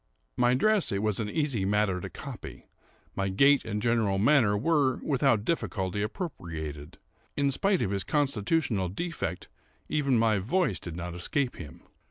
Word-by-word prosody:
My 125 0 +3
dress 215 +7 +2
it 100 +1 -1
was 105 -1 0
an 105 -2 -2
easy 140 -7 -1
matter 100 -2 +1
to - - -6
copy; - - -9 0.5
my 95 0 -1
gait 140 +9 +4
and 105 -2 -3
general 115 -3 +1
manner 110 -2 +4
were, 140 +1 +2
without 130 -7 +2
difficulty, 100 - -1
appropriated; 85 - -5 0.4
in 140 -1 +2
spite 195 +7 +1
of 95 - -1
his 100 -1 -1
constitutional 130 - 0
defect, 160 - -4 0.4
even 140 -5 +2
my 110 -3 +3
voice 125 - 0
did 85 -2 -7
not 90 0 -5
escape 125 +10 -2
him. 75 -5 -10
110 Hz, 155 wpm, -28 LUFS, 95-140 Hz, 0.5 s, gait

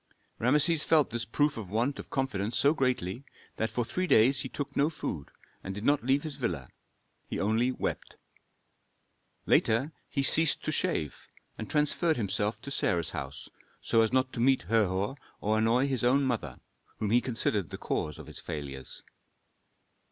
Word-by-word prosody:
Rameses 150 +6 +3
felt 155 -4 +3
this 115 -1 -2
proof 145 +5 +1
of 105 -5 -6
want 120 +7 -1
of - - -9
confidence 120 -5 -1
so 140 +2 +4
greatly 125 - -1 0.3
that 110 - 0
for 115 +2 -2
three 185 +9 -2
days 125 +2 +5
he - - -3
took 145 - -5
no 145 +2 +3
food 85 - -5 0.3
and 95 0 -5
did 105 - -6
not 145 -2 +2
leave 135 +3 +2
his 150 -3 -5
villa; 85 - -3 0.6
he - - -4
only 110 +5 +1
wept. - - -4 1.3
Later 125 +8 +2 0.2
he 140 - -1
ceased 160 +3 +5
to - - -1
shave, 75 - -2 0.3
and 110 - -7
transferred 155 +2 +2
himself 105 0 -1
to 140 - -6
Sarah's 85 - 0
house, 70 0 -6 0.3
so 115 - +2
as 110 - +2
not 130 0 +1
to - - -5
meet 130 +2 +3
Herhor 100 - 0 0.2
or 110 +1 +1
annoy 115 +4 +3
his 130 -4 -1
own 135 +3 +3
mother, 115 - -2 0.4
whom 105 -1 -2
he 120 +1 +4
considered 110 - -1
the - - -6
cause 75 -1 -3
of - - -10
his - - -9
failures. 70 -3 -6
120 Hz, 170 wpm, -29 LUFS, 105-140 Hz, 1.3 s, days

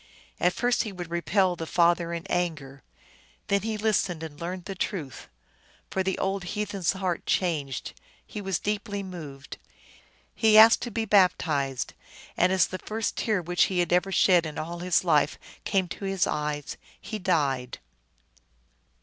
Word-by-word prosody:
At 180 +1 +3
first 245 0 +1
he 215 - -4
would 175 -3 -8
repel 180 +2 +1
the 165 -1 -6
father 170 0 +2
in 170 +1 -4
anger. 150 -8 -2 0.7
Then 200 0 +2
he 220 +1 -3
listened 200 -6 0
and 150 -2 -8
learned 180 +1 -5
the 195 - -4
truth. 170 - -5 0.6
So 190 - +1
the 190 0 -1
old 195 0 -1
heathen 205 +2 -4
s 175 -1 +2
heart 185 -3 -3
changed; 150 -8 -1 0.3
he 210 - -7
was 195 -3 -1
deeply 205 0 -3
moved. 150 -7 -9 0.8
He 220 -1 +4
asked 225 +1 +8
to 240 - -3
be 225 0 -2
baptized, 155 - +2 0.4
and 180 +1 +3
as 190 -2 +4
the 185 - -6
first 220 +1 -3
tear 210 -6 0
which 175 +1 +2
he 190 - -3
had 175 0 +1
ever 180 +2 +2
shed 180 -3 +4
in 155 - -8
all 170 +2 -5
his 180 0 +2
life 150 -4 +2 0.3
came 190 -3 +1
to 200 - -6
his 195 -1 +1
eyes 150 -1 -3 0.2
he 215 - -6
died. 140 -9 0
180 Hz, 165 wpm, -27 LUFS, 165-195 Hz, 0.8 s, asked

